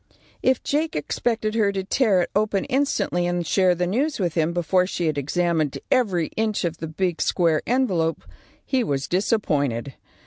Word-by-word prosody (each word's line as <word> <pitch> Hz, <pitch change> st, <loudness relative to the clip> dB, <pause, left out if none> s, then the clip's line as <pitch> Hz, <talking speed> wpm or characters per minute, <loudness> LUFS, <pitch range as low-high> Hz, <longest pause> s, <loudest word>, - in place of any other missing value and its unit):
If 260 Hz, -1 st, +2 dB
Jake 310 Hz, +3 st, -1 dB
expected 220 Hz, +7 st, -1 dB
her 215 Hz, -3 st, +2 dB
to 190 Hz, -1 st, -2 dB
tear 195 Hz, -3 st, +2 dB
it -, -, -6 dB
open 205 Hz, -2 st, +1 dB
instantly 265 Hz, -10 st, 0 dB
and 175 Hz, -1 st, -1 dB
share 185 Hz, +2 st, +3 dB
the 180 Hz, +1 st, 0 dB
news 265 Hz, -, -1 dB
with 175 Hz, -4 st, 0 dB
him 165 Hz, 0 st, +1 dB
before 180 Hz, +1 st, +1 dB
she 175 Hz, -2 st, -2 dB
had 155 Hz, -2 st, 0 dB
examined 155 Hz, +1 st, 0 dB
every 190 Hz, -11 st, +2 dB
inch 215 Hz, -2 st, 0 dB
of 165 Hz, -1 st, -2 dB
the 160 Hz, -, -5 dB
big 175 Hz, +2 st, -2 dB
square 165 Hz, -4 st, +2 dB
envelope, 190 Hz, -11 st, +1 dB, 0.4 s
he 260 Hz, -2 st, +1 dB
was 140 Hz, -8 st, -2 dB
disappointed. 145 Hz, -, 0 dB
180 Hz, 170 wpm, -23 LUFS, 165-220 Hz, 0.4 s, share